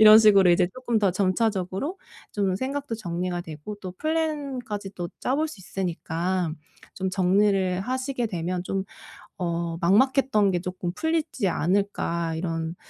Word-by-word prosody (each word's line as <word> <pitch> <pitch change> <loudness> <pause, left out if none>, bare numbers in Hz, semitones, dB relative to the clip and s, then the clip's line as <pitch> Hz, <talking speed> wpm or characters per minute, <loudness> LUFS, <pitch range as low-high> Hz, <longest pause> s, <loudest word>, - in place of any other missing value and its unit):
이런 215 0 +10
식으로 200 -4 +7
이제 175 +1 +4
쪼끔 240 -3 0
더 200 -3 +3
점차적으로 195 - 0 0.3
좀 195 -3 0
생각도 275 +1 -3
정리가 175 -2 -3
되고 155 +6 -7
또 185 -2 -5
플랜까지 275 - -2
또 175 -1 -4
짜 260 - 0
볼 315 +1 +1
수 210 - -10
있으니까 180 -2 -2 0.4
좀 190 -1 -2
정리를 190 0 +2
하시게 255 +1 -2
되면 180 -2 -2
좀 195 +1 -2 0.6
어 170 -1 -2
막막했던게 210 -2 +3
조금 180 -1 -4
풀리지 320 -10 0
않을까 170 -2 0
이런 165 -1 -3
195 Hz, 295 characters per minute, -26 LUFS, 175-230 Hz, 0.6 s, 이런